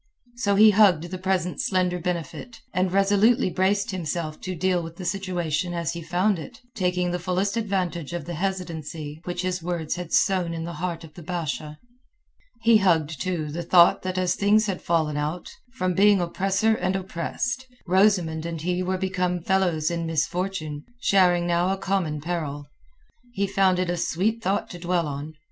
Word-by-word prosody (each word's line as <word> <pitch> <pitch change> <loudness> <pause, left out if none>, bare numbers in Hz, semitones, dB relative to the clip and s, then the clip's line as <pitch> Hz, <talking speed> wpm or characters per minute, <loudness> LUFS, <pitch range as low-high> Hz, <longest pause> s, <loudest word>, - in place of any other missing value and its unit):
So 205 -5 +1
he 215 +1 +8
hugged 195 -6 +5
the 185 - -4
present 185 -2 -1
slender 180 -2 +1
benefit, 180 +7 -4
and 185 0 +1
resolutely 200 +3 +3
braced 195 +3 +1
himself 165 -3 -4
to 185 -1 -4
deal 180 +1 +1
with 165 0 -8
the 185 - -8
situation 175 -3 -2
as 170 -1 -2
he 170 - -6
found 180 +3 +1
it, 155 - -10
taking 180 -4 0
the 180 - -2
fullest 185 +3 -1
advantage 185 -8 -2
of 170 -4 -4
the 175 - -5
hesitancy 165 -4 -4
which 175 0 -3
his 185 0 -1
words 170 -1 -3
had 180 -2 -6
sown 180 -4 +2
in 165 - -4
the 170 +1 -5
heart 170 -2 -3
of 155 -2 -12
the 175 - -11
Basha. 155 -3 -4 0.8
He 230 0 +6
hugged, 160 -7 +1
too, 170 -5 -2
the 170 +3 -4
thought 175 0 +5
that 185 0 -3
as 180 -1 +2
things 210 +3 +3
had 195 -3 -3
fallen 155 -3 0
out, 155 +4 -3 0.2
from 185 -7 0
being 200 +2 +5
oppressor 195 +5 +1
and 185 -3 -1
oppressed, 195 +7 -3 0.2
Rosamund 180 -4 +2
and 165 -1 -4
he 180 +3 -1
were 185 +1 -1
become 180 -1 -1
fellows 175 -5 +1
in 170 -1 -2
misfortune, 160 -1 -2 0.2
sharing 180 -6 +3
now 175 +1 +1
a 195 - -1
common 185 -6 -1
peril. 150 -3 -3 0.7
He 200 -3 0
found 190 -1 +2
it 185 0 0
a 175 - -2
sweet 210 +7 0
thought 195 0 0
to 175 - -8
dwell 175 -1 0
on. 145 +2 -5
180 Hz, 180 wpm, -25 LUFS, 165-190 Hz, 0.8 s, he